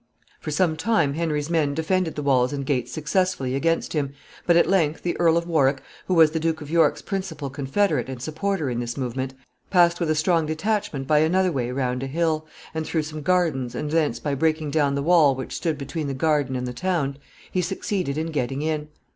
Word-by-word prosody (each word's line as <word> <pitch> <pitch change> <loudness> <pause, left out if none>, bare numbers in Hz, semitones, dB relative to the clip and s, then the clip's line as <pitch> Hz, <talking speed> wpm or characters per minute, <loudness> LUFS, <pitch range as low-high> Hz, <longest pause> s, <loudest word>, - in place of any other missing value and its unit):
For - - -6
some 160 +1 +1
time 160 -6 +2
Henry's 150 -2 -1
men 150 -4 +1
defended 165 +1 0
the 150 - -3
walls 130 -3 +3
and 140 -1 -3
gates 125 -3 -1
successfully 155 -2 0
against 165 +5 0
him, 140 -3 -1 0.3
but 170 -1 +5
at - - +4
length 165 -5 +1
the 175 - -1
Earl 165 -1 +4
of 170 - -1
Warwick, 140 -5 +2 0.2
who 185 - +1
was 160 -2 +6
the 160 - -1
Duke 160 0 0
of 150 0 -9
York's 165 -1 +3
principal 160 -8 -4
confederate 140 - 0
and 130 -2 -6
supporter 160 +4 -2
in 120 -2 -2
this 120 +1 -4
movement, 130 0 -3 0.3
passed 175 -2 +4
with 170 -3 0
a 155 - +2
strong 160 0 +2
detachment 160 -4 -1
by 150 +2 +4
another 180 +4 +3
way 125 -5 -2
round 125 -1 -1
a 135 - -3
hill, 155 +1 0 0.3
and 160 0 -2
through 160 -2 0
some 155 0 -6
gardens, 150 -7 +1
and 150 +3 -3
thence, 160 -2 +1
by 145 - -2
breaking 155 +1 0
down 145 -2 +2
the 140 - -1
wall 155 -4 +5
which 130 -1 -6
stood 160 -4 -1
between 145 +2 -4
the 135 - -3
garden 145 -2 +1
and 125 0 -2
the 125 - -4
town, 145 -3 -1 0.3
he 185 - +1
succeeded 180 -4 -2
in 160 +1 -2
getting 135 -1 -2
in. 155 -1 -1
155 Hz, 215 wpm, -24 LUFS, 140-170 Hz, 0.3 s, was